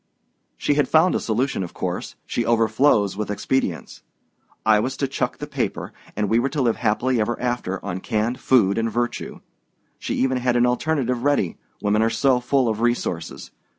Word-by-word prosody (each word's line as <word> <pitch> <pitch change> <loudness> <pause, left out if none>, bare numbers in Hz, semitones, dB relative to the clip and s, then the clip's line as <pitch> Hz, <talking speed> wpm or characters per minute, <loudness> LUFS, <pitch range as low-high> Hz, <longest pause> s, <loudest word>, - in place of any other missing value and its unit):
"She - - +1
had 145 0 +2
found 165 +3 +4
a - - +1
solution, 120 +1 -1
of 90 - -6
course - - -4
she 120 - -1
overflows 110 -2 +3
with 105 0 -4
expedients. 105 -3 -2 0.6
I 110 -1 +5
was 130 +5 -2
to 135 - 0
chuck 130 - -2
the - - -5
paper, - - -3 0.2
and 105 0 0
we 115 +3 +3
were 135 +3 0
to 150 -1 -2
live 115 -2 +1
happily 120 +2 +1
ever 120 +3 -1
afterward 120 -6 -2
on 95 -2 -4
canned 115 +3 -1
food 110 -6 +3
and 115 0 -1
virtue. 120 +2 -3 0.6
She - - -3
even 130 0 +1
had 125 -1 0
an 120 0 +4
alternative 125 -1 0
ready 145 -11 +1 0.2
women 105 +1 +2
are 115 - +3
so 130 +1 +2
full 130 +1 +1
of 110 -1 -1
resources! 120 -8 -2
120 Hz, 185 wpm, -22 LUFS, 105-130 Hz, 0.6 s, I